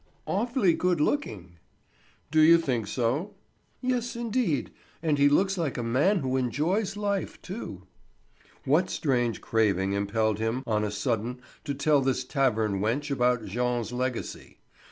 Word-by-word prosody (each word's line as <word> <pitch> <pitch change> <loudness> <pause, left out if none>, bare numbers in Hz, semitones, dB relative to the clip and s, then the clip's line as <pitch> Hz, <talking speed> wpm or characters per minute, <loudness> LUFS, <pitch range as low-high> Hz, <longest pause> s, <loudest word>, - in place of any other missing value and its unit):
"Awfully 215 -3 +1
good 180 0 +1
looking." 100 - -2 0.7
"Do 155 0 +4
you 165 +2 +8
think 125 -10 -1
so?" 130 - -1 0.5
"Yes, 250 -2 -1
indeed; 230 - -1 0.3
and 150 -3 +1
he 140 0 +6
looks 190 +5 +2
like 155 -5 -1
a 120 - -2
man 145 - +2
who 130 -1 0
enjoys 170 - 0
life, 200 -2 -2
too." 180 - -7 0.8
What 160 +7 +3
strange 120 -6 0
craving 100 -4 +1
impelled 105 +1 0
him 115 +4 -1
on 105 -2 0
a 105 - -1
sudden 115 +3 -2 0.3
to 140 -2 -2
tell 140 +1 +3
this 130 -1 0
tavern 115 -7 +1
wench 130 +8 -1
about 125 -3 +1
Jean's 120 +2 -1
legacy? 125 -1 -4
130 Hz, 140 wpm, -27 LUFS, 115-170 Hz, 0.8 s, you